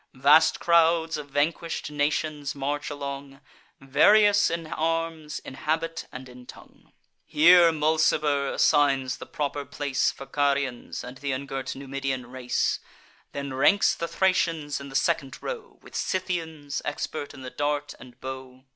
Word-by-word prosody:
Vast 145 +5 +5
crowds 165 -1 +3
of 150 -1 -7
vanquish'd 155 +2 -1
nations 150 0 -1
march 145 +1 -3
along, 140 -1 -6 0.4
Various 205 +10 +5
in 165 0 -3
arms, 165 -1 -2
in - - -9
habit, 165 +4 -2
and 130 0 -9
in 125 0 -14
tongue. - - -15 0.3
Here, 170 +2 +6
Mulciber 150 -2 +1
assigns 140 -4 +2
the - - -10
proper 145 -1 -3
place 140 -1 -1
For 135 - -8
Carians, 140 -2 -1
and 125 +2 -9
th' 135 - -13
ungirt 135 0 -4
Numidian 135 -2 -4
race; 125 -1 -1 0.5
Then 140 -1 -5
ranks 195 +10 +4
the 170 - -4
Thracians 165 -7 0
in 140 - -8
the 135 - -10
second 135 0 0
row, 470 -1 -7
With - - -15
Scythians, 160 -6 -3
expert 145 0 -4
in 135 - -11
the 130 - -7
dart 145 0 -2
and 125 -1 -14
bow. 130 0 -8
145 Hz, 140 wpm, -26 LUFS, 135-160 Hz, 0.5 s, Here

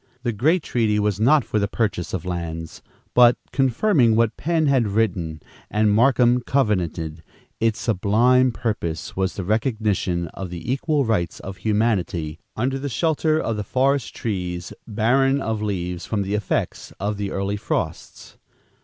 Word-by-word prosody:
The 120 - 0
great 155 - +2
treaty 110 -3 +1
was 105 -1 0
not 130 +5 +4
for 105 - 0
the 100 - +1
purchase 105 -5 -2
of 90 -3 -4
lands; 85 -2 -5 0.3
but, 120 -1 +6
confirming 135 - +3
what 115 0 +2
Penn 160 0 0
had 135 -6 +3
written 95 -7 -1 0.3
and 105 0 +2
Markham 125 +2 +4
covenanted, 90 - -1 0.4
its 115 0 +1
sublime 120 +5 +3
purpose 105 -9 -3
was 95 0 -1
the 95 - -4
recognition 105 -5 0
of 95 +2 -7
the 90 +8 -3
equal 145 0 0
rights 100 -7 -1
of 95 0 -7
humanity, 95 -8 0 0.2
under 130 +4 -1
the 140 +1 -3
shelter 155 +3 +1
of 115 -7 -2
the 105 - -2
forest 135 +4 0
trees, 90 -5 -4
barren 130 +5 +2
of 110 -5 -2
leaves 90 -4 -3
from 105 -3 -1
the 100 +1 -3
effects 105 -2 -2
of 100 +2 -2
the 100 -1 -3
early 100 +1 -2
frosts. 105 - -4
110 Hz, 155 wpm, -22 LUFS, 95-125 Hz, 0.4 s, but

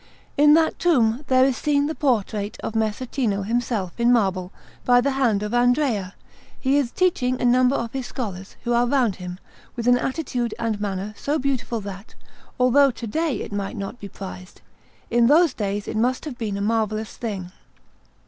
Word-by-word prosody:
In 295 +1 +6
that 325 0 +2
tomb 255 -7 +2
there 260 0 +5
is 265 -2 +1
seen 285 +3 +1
the 310 - -2
portrait 215 -8 -1
of - - -4
Messer 220 +2 -1
Cino 220 -6 -1
himself 225 -3 -2
in 235 +1 +4
marble, 190 -6 +1 0.3
by 245 0 +5
the 275 +3 +1
hand 240 -7 +1
of 210 - -4
Andrea; 245 -6 +1 0.4
he 270 +1 +2
is 275 -4 +1
teaching 255 -7 +1
a - - 0
number 250 +2 +4
of 235 -3 -3
his 265 -2 -4
scholars, 195 -6 -6
who 240 - 0
are 240 +1 +3
round 240 -7 +1
him, 180 0 -7 0.4
with 235 -1 -3
an 245 0 +5
attitude 250 -5 -2
and 220 -3 -2
manner 200 0 -3
so 290 +7 -1
beautiful 255 -5 -2
that, 200 +1 -9 0.4
although 265 +3 +5
to 235 -2 -6
day 295 +2 -1
it - - -6
might 200 -1 -3
not 200 +5 -6
be 200 - -8
prized, 185 -1 -10 0.5
in 235 0 +4
those 315 +1 +5
days 205 -1 -3
it - - -4
must 250 +5 0
have 295 -5 -5
been 215 -4 -3
a - - -3
marvellous 215 0 -1
thing. 195 -6 -5
235 Hz, 185 wpm, -23 LUFS, 205-260 Hz, 0.5 s, In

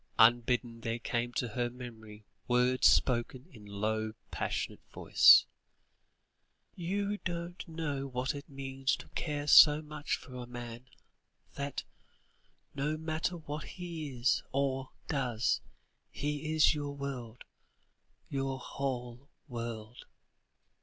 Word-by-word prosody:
Unbidden 120 0 +4
there 115 0 -2
came 120 0 -2
to 125 - -1
her 120 +2 -1
memory 110 -4 -10 0.2
words 125 +1 +4
spoken 125 +1 +2
in 105 -4 -13
a - - -11
low 110 +2 -1 0.2
passionate - - -3
voice: - - +7 1.3
"You 200 +4 -2
don't 175 0 -5
know 150 -4 -3
what 125 0 -2
it 140 -1 -8
means 135 -1 -1
to - - -12
care 145 -3 -3
so 150 0 +9
much 150 -1 -2
for 130 - -12
a 125 -1 -6
man, 120 0 -8 0.7
that, 140 -1 -4 0.9
no 150 +2 -1
matter 160 +3 -2
what 150 -2 -6
he 170 -5 -6
is, 120 +1 +3
or 135 -1 0 0.2
does, 125 -7 0 0.5
he 150 +2 -3
is 155 -2 +5
your 145 -1 -4
world, 125 -4 -6 0.8
your 135 -1 -2
whole 125 0 -4 0.2
world." 115 -2 -6
135 Hz, 120 wpm, -32 LUFS, 120-150 Hz, 1.3 s, so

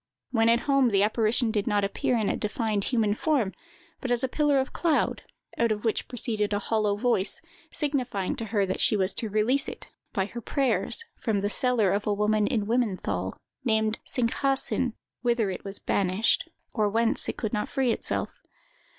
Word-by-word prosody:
When 225 -2 +3
at 235 +1 +4
home, 275 -2 +3
the 200 -2 +3
apparition 220 +2 +2
did 210 -2 -1
not 205 -2 +2
appear 200 +4 0
in 215 -3 0
a - - +1
defined 210 -1 -1
human 225 -5 +2
form, 245 -5 0 0.5
but 260 - -4
as 245 +1 +1
a - - +2
pillar 290 +1 +2
of 265 - -2
cloud, 325 -4 +1 0.4
out 235 -1 +3
of 210 +1 -2
which 220 - 0
proceeded 215 -4 -2
a - - +2
hollow 210 0 0
voice, 205 -2 +1 0.3
signifying 255 - -2
to 230 - -3
her 205 -2 +1
that 190 - -3
she 215 - +3
was 190 0 0
to 225 - -2
release 235 +8 +1
it, - - -10 0.2
by 195 -4 0
her 235 +4 -7
prayers, 255 - +1 0.2
from 215 -4 0
the 205 +1 0
cellar 240 -7 +3
of 205 +1 -1
a 210 - +2
woman 210 0 +2
in 225 -6 0
Wimmenthal, 190 - -1 0.3
named 220 -2 +1
Singhaasin, 255 0 +1 0.3
whither 235 -4 +1
it 185 - -6
was 195 0 -5
banished, 195 +3 +1 0.2
or 215 -2 +1
whence 225 +2 +2
it - - -4
could 220 -1 -3
not 210 -1 -1
free 265 -3 +1
itself. - - -2
220 Hz, 185 wpm, -27 LUFS, 205-245 Hz, 0.5 s, at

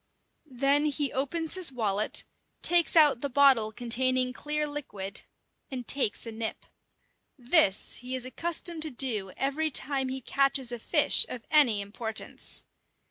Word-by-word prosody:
Then 280 +3 +2
he 290 -1 -1
opens 310 +5 -2
his 370 -6 +2
wallet, 215 -4 -1 0.4
takes 345 -1 +2
out 295 -6 +5
the 280 - -3
bottle 265 -5 +3
containing 250 +2 0
clear 300 +2 -2
liquid, 240 -9 -7 0.4
and 255 -4 -7
takes 265 -6 +1
a 230 - -6
nip. 220 0 -4 0.7
This 245 - +4
he 255 +1 -5
is 255 -1 -5
accustomed 335 +4 -3
to 315 - +5
do 235 -7 0
every 290 +4 -1
time 270 -2 0
he 265 +1 -4
catches 270 -1 0
a 240 - -5
fish - - +2
of 240 - -8
any 260 -10 +4
importance. 220 +2 -4
265 Hz, 140 wpm, -27 LUFS, 235-295 Hz, 0.7 s, out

